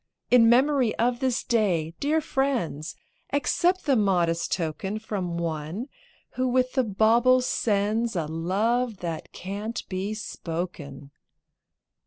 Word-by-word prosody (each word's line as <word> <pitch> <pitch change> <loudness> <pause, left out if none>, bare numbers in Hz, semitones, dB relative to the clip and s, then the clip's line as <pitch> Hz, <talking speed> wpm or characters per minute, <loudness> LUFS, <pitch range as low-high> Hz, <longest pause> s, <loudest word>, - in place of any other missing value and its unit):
In 235 -2 +7
memory 255 -1 +3
of 240 +1 +1
this 260 -1 0
Day, 185 -9 +1
dear 310 +3 +1
friends, 245 - -1 0.4
Accept 350 +6 +1
the 280 -3 +3
modest 175 -6 +1
token 185 +5 -2
From 190 -6 -4
one 165 - -4 0.4
who 255 0 -1
with 255 0 +1
the 260 - +2
bauble 230 +4 +4
sends 220 -1 0
A 165 -3 0
love 200 +8 -1
that 165 -3 -5
can't 205 +5 -5
be 195 +3 -3
spoken. 165 -8 -6
215 Hz, 120 wpm, -26 LUFS, 175-250 Hz, 0.4 s, In